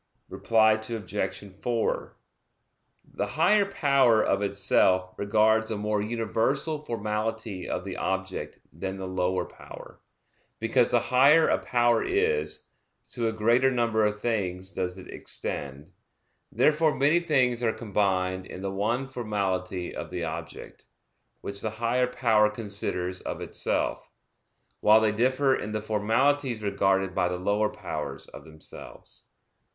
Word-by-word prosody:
Reply 110 Hz, -1 st, +3 dB
Obj. 110 Hz, -3 st, -4 dB, 0.2 s
4: 120 Hz, -2 st, -1 dB, 1.0 s
The -, -, -1 dB
higher 210 Hz, +1 st, +3 dB
power 135 Hz, -, +3 dB
of 100 Hz, -2 st, +1 dB
itself 95 Hz, -2 st, +2 dB
regards 110 Hz, +2 st, +2 dB
a 110 Hz, -, -2 dB
more 105 Hz, 0 st, -1 dB
universal 120 Hz, +7 st, -1 dB
formality 110 Hz, -5 st, -3 dB
of -, -, -3 dB
the -, -, -5 dB
object 95 Hz, 0 st, -3 dB, 0.2 s
than 95 Hz, +4 st, -5 dB
the 95 Hz, -, -5 dB
lower 95 Hz, 0 st, -1 dB
power; -, -, -13 dB, 0.6 s
because -, -, +2 dB
the -, -, +4 dB
higher 140 Hz, +6 st, +5 dB
a -, -, +2 dB
power 120 Hz, -1 st, +2 dB
is, 450 Hz, +3 st, 0 dB, 0.5 s
to 120 Hz, -2 st, -1 dB
a -, -, +1 dB
greater 115 Hz, +4 st, +3 dB
number 115 Hz, -3 st, +1 dB
of 105 Hz, 0 st, 0 dB
things 95 Hz, -5 st, -2 dB
does 90 Hz, 0 st, -3 dB
it 95 Hz, -, -10 dB
extend. 70 Hz, +1 st, -4 dB, 0.6 s
Therefore 150 Hz, +6 st, +3 dB
many 150 Hz, +5 st, +3 dB
things 130 Hz, -8 st, +1 dB
are 115 Hz, -2 st, +2 dB
combined 95 Hz, -4 st, -1 dB
in 95 Hz, -, -8 dB
the 95 Hz, -, -2 dB
one 115 Hz, +7 st, -1 dB
formality 95 Hz, -7 st, -3 dB
of -, -, -6 dB
the 90 Hz, -1 st, -4 dB
object, 80 Hz, 0 st, -7 dB, 0.6 s
which 100 Hz, 0 st, -3 dB
the 110 Hz, -, -1 dB
higher 120 Hz, +2 st, +1 dB
power 115 Hz, -4 st, +3 dB
considers 100 Hz, -4 st, -3 dB
of -, -, -5 dB
itself; -, -, -2 dB, 0.7 s
while 110 Hz, +1 st, +6 dB
they 110 Hz, -1 st, +2 dB
differ 130 Hz, +5 st, +2 dB
in 105 Hz, -3 st, -5 dB
the 110 Hz, -, -1 dB
formalities 115 Hz, +4 st, +1 dB
regarded 95 Hz, -2 st, +1 dB
by 90 Hz, -2 st, +1 dB
the 90 Hz, -, -3 dB
lower 100 Hz, +3 st, +1 dB
powers -, -, -6 dB
of -, -, -12 dB
themselves. 80 Hz, -1 st, -10 dB
110 Hz, 135 wpm, -27 LUFS, 95-120 Hz, 1.0 s, while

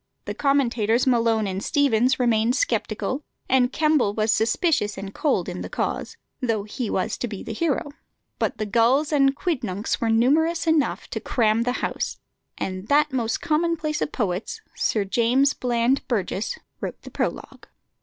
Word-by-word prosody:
The -, -, -3 dB
commentators 245 Hz, -5 st, +2 dB
Malone 230 Hz, -4 st, +2 dB
and 190 Hz, 0 st, -3 dB
Steevens 260 Hz, -4 st, +2 dB
remained 235 Hz, 0 st, +2 dB
sceptical, 290 Hz, -, -1 dB, 0.3 s
and 255 Hz, -1 st, +3 dB
Kemble 300 Hz, -10 st, +2 dB
was 215 Hz, 0 st, +2 dB
suspicious 220 Hz, -, +1 dB
and 195 Hz, 0 st, -6 dB
cold 265 Hz, -, 0 dB
in 180 Hz, -1 st, -5 dB
the -, -, -6 dB
cause, -, -, -3 dB, 0.2 s
though 225 Hz, -5 st, 0 dB
he 215 Hz, +2 st, -4 dB
was 185 Hz, -, -1 dB
to 245 Hz, -, -2 dB
be 205 Hz, -4 st, -7 dB
the -, -, -5 dB
hero; 290 Hz, +2 st, -1 dB, 0.5 s
but -, -, -1 dB
the 215 Hz, -, -2 dB
gulls 240 Hz, +8 st, +2 dB
and 275 Hz, -1 st, +4 dB
quidnuncs 230 Hz, -, -2 dB
were 230 Hz, -, +1 dB
numerous 310 Hz, +10 st, +3 dB
enough 320 Hz, -3 st, +1 dB
to -, -, -2 dB
cram 225 Hz, -2 st, +1 dB
the 245 Hz, +1 st, 0 dB
house, -, -, -3 dB, 0.4 s
and 185 Hz, +1 st, -4 dB
that 295 Hz, +1 st, +3 dB
most 235 Hz, -3 st, -1 dB
commonplace 315 Hz, -1 st, 0 dB
of -, -, -1 dB
poets, 195 Hz, -3 st, -2 dB, 0.2 s
Sir 210 Hz, -3 st, 0 dB
James 245 Hz, +7 st, +3 dB
Bland 245 Hz, +2 st, +1 dB
Burges, 205 Hz, -3 st, -2 dB, 0.2 s
wrote -, -, -6 dB
the -, -, -10 dB
prologue. -, -, -4 dB
240 Hz, 160 wpm, -24 LUFS, 215-285 Hz, 0.5 s, and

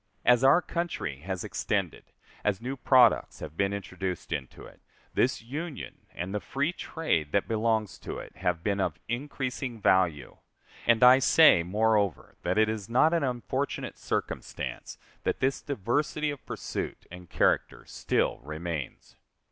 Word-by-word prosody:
As 125 Hz, +1 st, +5 dB
our 140 Hz, +7 st, +6 dB
country 170 Hz, -, -3 dB
has 90 Hz, +3 st, -4 dB
extended, -, -, -2 dB, 0.4 s
as 105 Hz, -2 st, +1 dB
new 130 Hz, +4 st, -4 dB
products 130 Hz, -1 st, +4 dB
have 80 Hz, -, -8 dB
been 100 Hz, +2 st, +1 dB
introduced 95 Hz, -2 st, -5 dB
into 65 Hz, -, -5 dB
it, -, -, -15 dB, 0.3 s
this 125 Hz, -2 st, +1 dB
Union 150 Hz, +5 st, -7 dB
and 90 Hz, +3 st, -4 dB
the 105 Hz, -, 0 dB
free 140 Hz, -, -1 dB
trade 80 Hz, -, -2 dB
that 100 Hz, -, +2 dB
belongs 110 Hz, -2 st, 0 dB
to -, -, -6 dB
it -, -, -10 dB
have 90 Hz, -3 st, -1 dB
been 100 Hz, -1 st, 0 dB
of 85 Hz, -4 st, -1 dB
increasing 130 Hz, -1 st, -3 dB
value. 90 Hz, -7 st, +2 dB, 0.5 s
And 115 Hz, 0 st, +5 dB
I 125 Hz, +1 st, +9 dB
say, 150 Hz, -, +6 dB
moreover, 105 Hz, 0 st, +1 dB
that 90 Hz, +3 st, -1 dB
it 110 Hz, 0 st, +5 dB
is 110 Hz, -1 st, -4 dB
not 150 Hz, +8 st, +4 dB
an 170 Hz, -, +2 dB
unfortunate 125 Hz, -6 st, -3 dB
circumstance -, -, -4 dB, 0.3 s
that -, -, -1 dB
this 135 Hz, +1 st, 0 dB
diversity 145 Hz, +5 st, -1 dB
of 145 Hz, -, -9 dB
pursuit -, -, -5 dB
and 90 Hz, 0 st, -11 dB
character -, -, +1 dB
still -, -, -1 dB
remains. 75 Hz, 0 st, -6 dB
110 Hz, 150 wpm, -28 LUFS, 90-135 Hz, 0.5 s, I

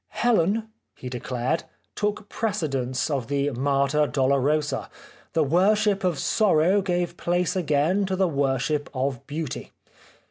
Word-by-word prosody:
" -, -, -20 dB
Helen/' 220 Hz, -1 st, +2 dB, 0.3 s
he 125 Hz, -, -7 dB
declared, 125 Hz, +4 st, -2 dB
" -, -, -43 dB
took 210 Hz, 0 st, -2 dB
precedence 140 Hz, -, -1 dB
of 135 Hz, -5 st, -1 dB
the 140 Hz, 0 st, 0 dB
Mater 140 Hz, +3 st, +1 dB
Dolorosa; 140 Hz, +2 st, +1 dB, 0.4 s
the 160 Hz, -, +3 dB
worship 195 Hz, +6 st, +2 dB
of 180 Hz, -5 st, +1 dB
sorrow 190 Hz, 0 st, +3 dB
gave 175 Hz, -2 st, -1 dB
place 175 Hz, +1 st, 0 dB
again 175 Hz, +3 st, +1 dB
to 190 Hz, -, -1 dB
the 190 Hz, 0 st, +2 dB
worship 140 Hz, 0 st, 0 dB
of 130 Hz, -1 st, -2 dB
beauty." 150 Hz, -1 st, -5 dB
155 Hz, 135 wpm, -25 LUFS, 140-185 Hz, 0.4 s, the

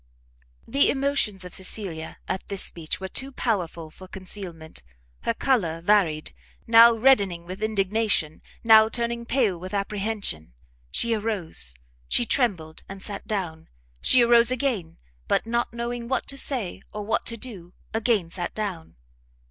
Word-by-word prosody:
The 280 Hz, -, +3 dB
emotions 270 Hz, -9 st, 0 dB
of 180 Hz, -, -9 dB
Cecilia 185 Hz, -4 st, -3 dB
at 190 Hz, -, -3 dB
this 200 Hz, -2 st, -2 dB
speech 160 Hz, -2 st, -3 dB
were 190 Hz, -, -4 dB
too 265 Hz, +8 st, -3 dB
powerful 175 Hz, -, -2 dB
for 185 Hz, +3 st, -13 dB
concealment; 185 Hz, -4 st, -6 dB, 0.4 s
her -, -, +2 dB
colour 190 Hz, -13 st, +1 dB
varied, 170 Hz, -4 st, +2 dB, 0.3 s
now 230 Hz, 0 st, +8 dB
reddening 200 Hz, -8 st, +3 dB
with 185 Hz, +3 st, -7 dB
indignation, 210 Hz, -6 st, +1 dB, 0.2 s
now 220 Hz, -1 st, +7 dB
turning 235 Hz, 0 st, -2 dB
pale 230 Hz, -9 st, +1 dB
with 185 Hz, +3 st, -6 dB
apprehension; 200 Hz, -, -2 dB, 0.4 s
she 230 Hz, -, +1 dB
arose, 190 Hz, -, 0 dB, 0.3 s
she 240 Hz, -, +3 dB
trembled 185 Hz, -, 0 dB
and 195 Hz, 0 st, -8 dB
sat 200 Hz, -2 st, -5 dB
down, 180 Hz, -7 st, -3 dB, 0.3 s
she 250 Hz, -1 st, +5 dB
arose 235 Hz, 0 st, +6 dB
again, 250 Hz, -10 st, -1 dB, 0.3 s
but -, -, +1 dB
not 235 Hz, +1 st, -1 dB
knowing 235 Hz, 0 st, -4 dB
what 265 Hz, -, -1 dB
to 275 Hz, -, -2 dB
say 245 Hz, -9 st, 0 dB
or 210 Hz, -, -5 dB
what 220 Hz, -, 0 dB
to 230 Hz, -, -3 dB
do, 190 Hz, -8 st, -9 dB, 0.2 s
again 220 Hz, -6 st, +1 dB
sat 175 Hz, 0 st, -5 dB
down. 195 Hz, -7 st, -4 dB
210 Hz, 145 wpm, -25 LUFS, 175-235 Hz, 0.4 s, now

